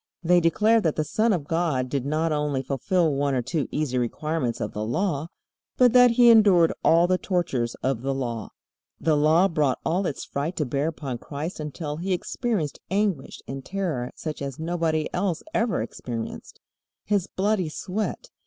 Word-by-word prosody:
They 175 +1 +5
declare 215 +7 +3
that 160 -5 0
the 155 - 0
Son 215 +9 +1
of 175 -7 0
God 160 -6 0
did 135 0 -2
not 155 +2 0
only 150 -3 -1
fulfill 155 +5 +1
one 140 0 0
or 125 - 0
two 155 +2 -2
easy 140 -4 -1
requirements 125 +1 -2
of 105 - -3
the 105 - -3
Law, 145 - -1 0.5
but 250 -2 +5
that 250 -1 +8
He 240 0 +6
endured 195 -7 +6
all 165 +1 +5
the 185 +1 +1
tortures 135 - -1
of 130 -3 0
the 135 +2 -1
Law. 120 -5 -3 0.5
The 160 -1 +2
Law 155 +5 +4
brought 150 -7 +1
all 180 +3 +1
its 140 - -4
fright 150 +6 -3
to 150 - -1
bear 140 +4 -1
upon 140 -6 -4
Christ 150 +7 -6
until 150 0 -5
He 185 +3 -1
experienced 185 - -2
anguish 195 -8 -1
and 135 0 -6
terror 170 -11 -3
such 155 -3 -6
as 140 -2 -4
nobody 160 -1 -1
else 180 -3 -1
ever 230 -1 +1
experienced. 115 -2 -7 0.4
His 200 -3 0
bloody 195 -3 0
sweat. 210 - -4
160 Hz, 175 wpm, -25 LUFS, 140-185 Hz, 0.5 s, that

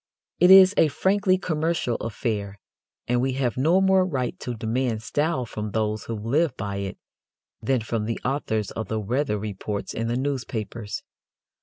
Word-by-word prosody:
It 180 - +6
is 190 0 +9
a 160 - +6
frankly 190 +5 +2
commercial 160 -7 -1
affair, 105 -3 -3 0.5
and 120 0 +2
we 130 0 0
have 125 -3 -1
no 160 +8 +3
more 190 -1 +4
right 135 -9 -1
to 125 - -4
demand 115 0 -1
style 145 +3 0
from 105 -1 -5
those 110 -1 -1
who 115 - -4
live 130 +8 0
by 100 0 -3
it 100 -1 -4 0.6
than 130 -3 +1
from 110 0 -2
the 115 +1 -3
authors 110 -6 -1
of 110 - -5
the 110 - -2
weather 115 +2 -1
reports 105 0 -4
in 115 0 -2
the 120 +1 0
newspapers. 120 -5 -4
120 Hz, 165 wpm, -25 LUFS, 110-150 Hz, 0.6 s, is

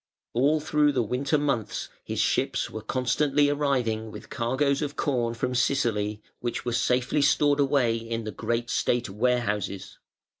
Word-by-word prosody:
All 140 +6 +3
through 150 -1 +2
the 125 -3 +1
winter 135 +7 0
months 140 -7 -2
his - - -4
ships - - 0
were - - -6
constantly 140 +3 +1
arriving 125 -7 0
with - - -11
cargoes 135 +4 0
of 145 -1 -3
corn 120 -4 0
from 125 +2 -2
Sicily, 110 -5 0 0.2
which 120 -1 -3
were 120 - -1
safely 125 +4 +1
stored 145 0 +3
away 135 -5 +2
in 115 0 -4
the 110 - -4
great 115 +4 -2
State 120 -4 0
warehouses. 105 -3 -1
125 Hz, 150 wpm, -26 LUFS, 115-140 Hz, 0.2 s, All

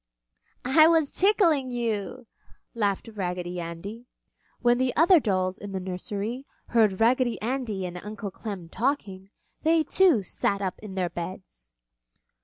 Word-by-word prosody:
"I 310 +5 +6
was 325 -3 +3
tickling 345 -9 +3
you!" 235 0 -3 0.5
laughed 205 -2 -1
Raggedy 180 -2 -3
Andy. 195 +8 -7 0.5
When 240 0 +3
the 255 -1 0
other 340 +2 +6
dolls 185 -6 -1
in 200 -1 -7
the 190 - -2
nursery 200 +7 -4 0.2
heard 215 -5 +3
Raggedy 240 +1 +2
Andy 225 -5 -2
and 180 0 -6
Uncle 210 -1 -6
Clem 195 -5 -7
talking, 195 - -2 0.3
they 320 0 +3
too 335 - +4
sat 200 +2 -1
up 190 -2 -3
in 205 -3 -9
their 180 -3 -1
beds. 170 - -8
210 Hz, 135 wpm, -26 LUFS, 185-255 Hz, 0.5 s, I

